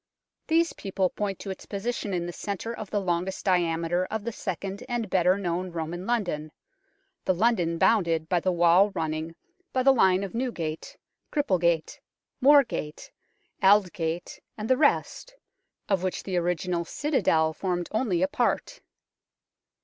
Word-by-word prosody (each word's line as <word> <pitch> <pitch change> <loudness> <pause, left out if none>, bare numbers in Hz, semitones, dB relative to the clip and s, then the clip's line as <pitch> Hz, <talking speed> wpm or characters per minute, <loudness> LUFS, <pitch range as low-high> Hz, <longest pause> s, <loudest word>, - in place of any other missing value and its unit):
These 330 +1 +2
people 190 -2 -1
point 200 -3 -3
to 195 - -6
its 190 - -9
position 205 +1 -3
in 175 -2 -1
the 175 - -5
centre 205 +5 -4
of 215 -3 -7
the 205 - 0
longest 185 0 -2
diameter 175 -1 +1
of 220 -1 -4
the 235 - -3
second 195 +1 -5
and 240 -2 -1
better 185 +1 +3
known 180 -1 -2
Roman 170 +2 -5
London 175 -10 -1 0.7
the 185 - +1
London 180 -5 +1
bounded 165 -6 +2
by 175 +1 +2
the 185 +2 0
wall 175 +3 +5
running 160 +1 -3 0.4
by 255 - +1
the 270 +1 +6
line 190 -6 +3
of 195 - -5
Newgate, 180 -11 -4 0.3
Cripplegate, 175 - +1 0.4
Moorgate, 265 - +3 0.5
Aldgate, 180 -4 +2 0.2
and 215 0 -4
the 260 - +4
rest, 310 - 0 0.5
of 195 -3 +1
which 185 -1 -2
the 190 - -3
original 175 0 0
citadel 165 - +1
formed 175 0 -2
only 215 -6 +1
a - - +3
part. 250 - -1
185 Hz, 145 wpm, -27 LUFS, 170-215 Hz, 0.7 s, the